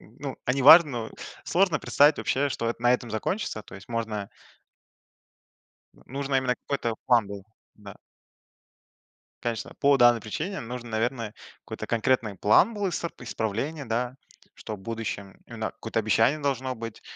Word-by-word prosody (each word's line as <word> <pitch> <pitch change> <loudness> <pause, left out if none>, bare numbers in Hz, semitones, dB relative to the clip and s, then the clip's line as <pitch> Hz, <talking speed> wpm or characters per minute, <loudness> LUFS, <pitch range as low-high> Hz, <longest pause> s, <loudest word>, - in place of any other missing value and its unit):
н 110 - -19
ну, 140 -2 -5
они 130 +1 +1
важно, 160 +2 +9 0.2
но - - -22 0.3
сложно 185 -2 +2
представить 145 +2 +4
вообще, 140 +2 0
что 115 -3 -2
это 120 - -7
на 120 - +5
этом 120 -2 -1
закончится, 110 - -2
то - - -14
есть 95 +1 -12
можно 110 -4 -3 1.7
Вот, - - -22
нужно 140 +1 -2
именно 130 -1 +1
какой-то 120 -5 -3
план 120 -5 +4
был, 100 -1 -8 0.3
да. 100 -2 -12 1.5
Конечно, 115 -3 -3
по 140 0 +5
данной 120 -2 +5
причине 160 - -4
нужно, 120 0 -7
наверное, 115 -1 -2 0.3
какой-то - - -6
конкретный 115 -3 0
план 170 - +4
был 205 -2 -1
иср 170 -1 -3
исправление, 120 +6 -3
да, 120 +2 -2 0.4
что 110 - -6
в - - -16
будущем, 100 -2 -5
именно, 115 -2 -4
какое-то 115 0 -3
обещание 110 +7 +2
должно 130 -3 -1
быть, 115 -1 -8
120 Hz, 155 wpm, -26 LUFS, 110-140 Hz, 1.7 s, важно